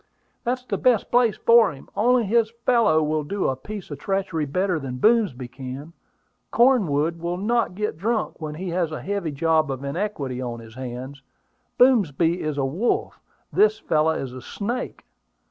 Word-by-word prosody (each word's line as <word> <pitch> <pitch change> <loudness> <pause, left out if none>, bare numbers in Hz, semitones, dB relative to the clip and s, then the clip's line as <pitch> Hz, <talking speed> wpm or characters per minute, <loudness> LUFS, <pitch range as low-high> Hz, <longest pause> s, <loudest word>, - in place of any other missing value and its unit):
"That's 250 0 -2
the - - -2
best 245 -5 +2
place 240 -4 +3
for 230 -1 +5
him; 135 -2 -13
only 245 +1 +3
this 225 +2 +2 0.2
fellow 225 -11 +4
will 155 0 0
do 200 +7 -2
a 130 - 0
piece 200 +6 -8
of 145 - -6
treachery 190 -5 -1
better 180 +4 0
than 130 -3 -5
Boomsby 195 - +2
can. 135 +5 -8 0.6
Cornwood 170 - +3
will 170 +1 -3
not 225 0 0
get 210 -5 -3
drunk 220 -2 -1
when 155 -1 -5
he 180 +3 -5
has 170 -2 -1
a 155 - -6
heavy 200 -4 -2
job 155 +1 +2
of 135 0 -4
iniquity 140 -5 -3
on 120 -2 -4
his 110 -1 -12
hands. 130 +2 -7 0.6
Boomsby 180 - +3
is 155 -2 -3
a 135 - +1
wolf: 175 - -1 0.3
this 215 0 +4
fellow 160 -5 +1
is 135 -5 -5
a 130 - -8
snake. 235 - -5
170 Hz, 170 wpm, -23 LUFS, 140-215 Hz, 0.6 s, for